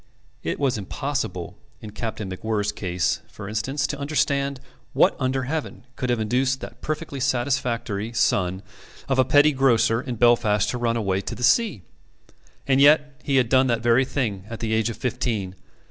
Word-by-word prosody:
It - - -3
was 135 -6 +1
impossible 95 - -4 0.2
in 105 - -9
Captain 110 -1 -5
MacWhirr's 105 +2 -2
case, 90 0 -1
for 105 -2 -10
instance, 135 +7 -2
to 145 0 -4
understand 140 -2 0 0.3
what - - +4
under 130 0 0
heaven 150 -2 -4
could 125 - -3
have 120 -2 +1
induced 130 +4 +1
that - - -9
perfectly 155 -2 -4
satisfactory 120 -4 -1
son 95 -4 +1 0.4
of 135 -1 +1
a - - +7
petty 145 +4 +5
grocer 120 -4 +3
in 125 -2 -5
Belfast 115 -3 +3
to 125 - -4
run 115 -1 0
away 95 -3 0
to 115 +4 -6
sea. 180 - +2 0.8
And 135 0 +3
yet 145 -1 +4
he 140 - 0
had 130 -3 +4
done 130 +2 +4
that 115 -2 0
very 120 +2 +4
thing 115 -8 -3
at 115 - -6
the 110 -1 -2
age 110 +1 +1
of 115 - -6
fifteen. 115 -6 -2
120 Hz, 170 wpm, -24 LUFS, 110-135 Hz, 0.8 s, a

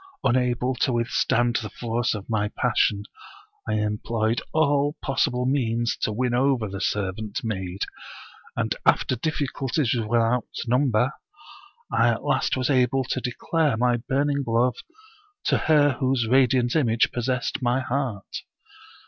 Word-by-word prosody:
Unable 125 +1 +1
to 130 - +1
withstand 120 0 +1
the 105 - -4
force 115 0 -2
of 105 -1 -7
my 105 -2 0
passion, 100 -1 +1 0.7
I - - +1
employed 110 +2 -1
all 145 -1 +2
possible 130 -2 0
means 120 -3 0
to - - -1
win 120 +3 -1
over 125 -3 +2
the 100 0 -6
servant 105 +1 -2
maid, 95 -4 -3 0.7
and - - 0
after 130 - +3
difficulties 135 -1 -1
without 115 +1 +1 0.2
number 125 0 +2 0.8
I - - +3
at - - -1
last - - +1
was 130 +2 0
able 130 0 +2
to 130 0 -3
declare 140 +2 0
my 120 0 +2
burning 140 +4 0
love 115 +2 +2 0.7
to - - +2
her 150 -2 +4
whose 130 -2 +1
radiant 125 0 +3
image 115 -7 +2
possessed 125 +2 -2
my 125 +1 +1
heart. 130 -6 -3
125 Hz, 130 wpm, -24 LUFS, 115-135 Hz, 0.8 s, her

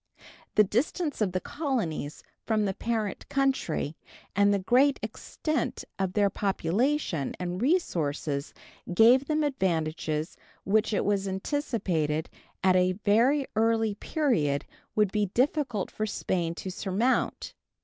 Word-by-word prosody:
The 215 - +7
distance 285 - -1
of 200 -4 +2
the 185 - -1
colonies 215 - -3 0.2
from 215 -2 +1
the 195 - 0
parent 220 -1 -3
country 265 - 0 0.4
and 200 +1 +4
the 200 - +3
great 255 +8 +3
extent 310 -6 -3
of 190 -1 -1
their 205 -1 +3
population 195 - 0
and 180 +1 -3
resources 155 - 0 0.4
gave 235 +8 +6
them 305 +1 +1
advantages 160 - -1 0.3
which 215 +4 +2
it 210 - 0
was 200 -1 +1
anticipated 190 - -1 0.3
at 185 -1 +5
a 185 0 +3
very 250 +7 +4
early 225 -1 +2
period 200 - 0 0.3
would 210 -3 +3
be 210 -1 +1
difficult 255 - +1
for 215 - -2
Spain 170 -4 -1
to 185 - -5
surmount. 205 +7 0
205 Hz, 125 wpm, -28 LUFS, 180-255 Hz, 0.4 s, The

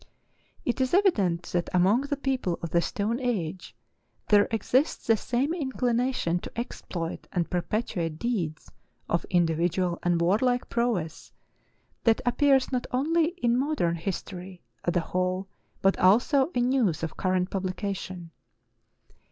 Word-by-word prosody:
It 245 +2 0
is 260 +6 +2
evident 200 - +2
that 175 -1 0
among 190 +7 +4
the 285 0 -1
people 260 -11 -1
of 170 - -4
the 170 - +3
stone 215 +7 -1
age 190 -9 -3 0.5
there 205 -1 +6
exists 250 +6 +1
the 225 - +5
same 255 +8 -1
inclination 250 - 0
to - - -9
exploit 175 -8 -5
and 175 -2 -1
perpetuate 175 -3 -2
deeds 180 -8 -3 0.4
of 170 - 0
individual 175 +1 +1
and 175 -1 +1
warlike 230 +9 +2
prowess, 225 -10 -1 0.7
that 225 -1 +4
appears 270 +2 +3
not 250 -2 -1
only 315 +6 +2 0.2
in 235 0 +3
modern 260 - +1
history 180 +1 -6 0.2
as 175 - -1
a 175 - +3
whole 185 +2 -1 0.4
but 195 0 +3
also 255 - +4
in 245 0 +2
news 225 - +1
of 160 - -3
current 185 -1 0
publication. 185 -2 -4
200 Hz, 135 wpm, -27 LUFS, 175-250 Hz, 0.7 s, there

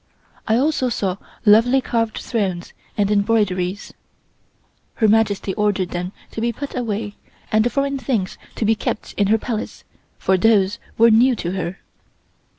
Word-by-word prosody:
I 220 - +3
also 265 -1 +1
saw 195 -5 -1 0.3
lovely 230 +5 +6
carved 230 -3 -1
thrones 190 -7 -3 0.2
and 205 -1 +1
embroideries. 200 -3 0 1.0
Her 220 - +3
Majesty 210 -2 +2
ordered 205 -3 0
them 180 +1 -4 0.2
to 225 - -5
be 235 +1 +1
put 275 +5 -7
away, 215 -4 -3 0.3
and 215 0 +4
the 240 - +1
foreign 275 +1 -1
things 225 -8 -2 0.2
to 225 - -1
be 220 - +4
kept 215 - -4
in 200 - +1
her 220 +2 +4
Palace, 225 -1 -5 0.3
for 190 - +2
those 205 0 +3 0.2
were 230 +1 +6
new 245 +3 +5
to 175 -5 -3
her. 185 0 -4
215 Hz, 155 wpm, -21 LUFS, 195-230 Hz, 1.0 s, lovely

